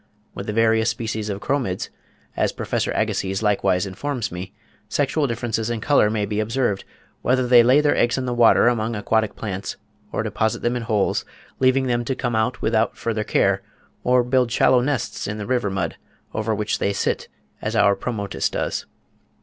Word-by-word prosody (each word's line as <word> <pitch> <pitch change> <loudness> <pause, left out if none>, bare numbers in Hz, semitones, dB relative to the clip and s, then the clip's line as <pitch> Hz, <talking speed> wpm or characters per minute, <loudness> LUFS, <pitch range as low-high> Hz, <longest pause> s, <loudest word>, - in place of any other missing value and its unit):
With 100 - -7
the - - -1
various 110 0 +3
species 110 -2 -3
of 100 0 -4
Chromids, 125 -10 -1 0.5
as - - +1
Professor - - -2
Agassiz 95 +2 -1
likewise 100 -3 +2
informs 120 +6 -3
me, 90 +2 -6 0.4
sexual 145 +1 +1
differences 115 -1 -2
in 120 -1 -2
colour 140 -5 +3
may 105 -1 0
be 105 +1 -2
observed, 110 -2 0 0.4
"whether 130 +1 +2
they 120 -1 +7
lay 130 +5 +5
their 150 -1 +2
eggs 120 +2 +2
in 130 - -2
the 125 - -1
water 120 0 +5
among 115 -1 +1
aquatic 110 +1 0
plants, 100 -3 -5 0.3
or - - -1
deposit 110 -1 -1
them 120 +1 +1
in 120 - -2
holes, 110 -4 0 0.4
leaving 130 +1 +3
them 120 -1 0
to 130 - -1
come 120 -3 -2
out 110 +3 0
without 110 -1 +1
further 110 -2 -2
care, - - +2 0.4
or 125 0 +4
build 125 -1 +1
shallow 125 +1 +4
nests 135 -2 -2
in 105 +1 -3
the 105 - -5
river 120 -4 0
mud, 95 -4 -2 0.4
over 110 0 -1
which 105 +1 -1
they 100 - 0
sit, - - -1 0.3
as 110 +2 -2
our 105 -2 +4
Pomotis 100 -1 -2
does. - - -3
115 Hz, 180 wpm, -22 LUFS, 105-125 Hz, 0.5 s, they